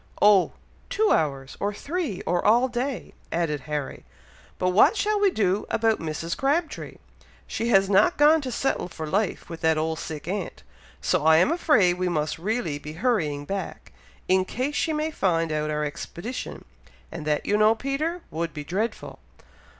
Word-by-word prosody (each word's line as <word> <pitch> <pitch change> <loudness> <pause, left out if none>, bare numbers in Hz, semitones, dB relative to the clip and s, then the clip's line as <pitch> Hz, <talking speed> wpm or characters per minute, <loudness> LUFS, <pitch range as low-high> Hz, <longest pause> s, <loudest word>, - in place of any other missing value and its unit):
"Oh! 205 -3 +5 0.4
two 435 0 +2
hours, 135 -4 0
or 205 - 0
three, 295 - -3
or 175 0 0
all 240 +4 +4
day," 250 -2 -4 0.2
added 165 -3 0
Harry. 150 -2 -4 0.5
"But 180 - +1
what 215 - +5
shall 420 +1 +1
we 405 -1 +4
do 200 - 0
about 225 -1 +1
Mrs. 165 +1 -3
Crabtree? 300 +4 -1 0.5
She 230 - -3
has 195 -4 +4
not 205 - +4
gone 300 +2 +5
to 260 -2 -4
settle 270 -6 -1
for 160 -3 -7
life 195 +5 -1
with 165 -1 -8
that 160 -1 +3
old 160 0 -1
sick 155 0 -6
aunt, 200 +3 -4 0.4
so 180 -4 +1
I 160 0 +6
am 180 - +4
afraid 215 - +3
we 185 0 0
must 155 -2 -1
really 190 -6 -2
be 150 +1 -8
hurrying 160 - 0
back, 195 +4 -5 0.4
in 185 0 +3
case 255 +9 -3
she 320 - 0
may 310 +1 -1
find 165 - 0
out 155 0 -1
our 150 0 -1
expedition, 175 - -6 0.5
and 165 -1 -6
that, 150 -1 0
you 205 - +1
know, 215 +1 +5
Peter, 300 +8 -2
would 165 +1 -3
be 150 - -5
dreadful!" 200 +9 -3
190 Hz, 175 wpm, -25 LUFS, 160-255 Hz, 0.5 s, I